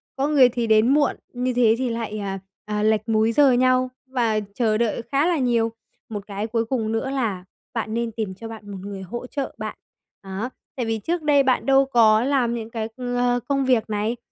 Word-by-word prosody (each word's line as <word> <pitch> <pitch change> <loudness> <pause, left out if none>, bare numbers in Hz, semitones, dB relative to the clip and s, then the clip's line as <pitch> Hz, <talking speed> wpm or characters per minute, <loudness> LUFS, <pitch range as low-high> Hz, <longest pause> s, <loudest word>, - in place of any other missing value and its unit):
có 275 +1 0
người 280 -4 +6
thì 240 -1 -2
đến 220 +1 +5
muộn, 290 -1 +3 0.2
như 250 +1 -1
thế 235 -2 +4
thì 255 0 -1
lại, 225 -2 -3
à, 195 -1 -4 0.3
à, 210 0 -2
lệch 215 +1 +1
múi 220 0 +3
giờ 275 +3 +5
nhau 255 +1 +3 0.2
và 235 -4 +1
chờ 220 -1 +1
đợi 235 0 0
khá 280 +2 +3
là 350 -2 +2
nhiều. 235 -4 +1 0.4
Một 205 -2 -6
cái 205 +1 -4
cuối 230 0 0
cùng 225 -2 -1
nữa 225 +4 -1
là 225 -9 -2 0.3
bạn 220 -2 -3
nên 235 0 -1
tìm 215 -3 -4
cho 225 +4 -8
bạn 220 -2 -9
một 195 - -6
người 200 0 -7
hỗ 240 +7 -6
trợ 275 0 -4
bạn, - - -5 0.5
đó. 195 +5 -4 0.3
Tại 245 - -2
vì 225 0 -1
trước 335 +10 -2
đây 290 -2 +4
bạn 255 -1 +1
đâu 270 0 +5
có 225 -4 +4
làm 255 -3 +1
những 225 -2 -5
cái, 225 -1 -3
ờ, 245 -1 0
công 275 -1 +1
việc 245 -4 +2
này. 215 +3 -1
230 Hz, 220 wpm, -23 LUFS, 215-255 Hz, 0.5 s, người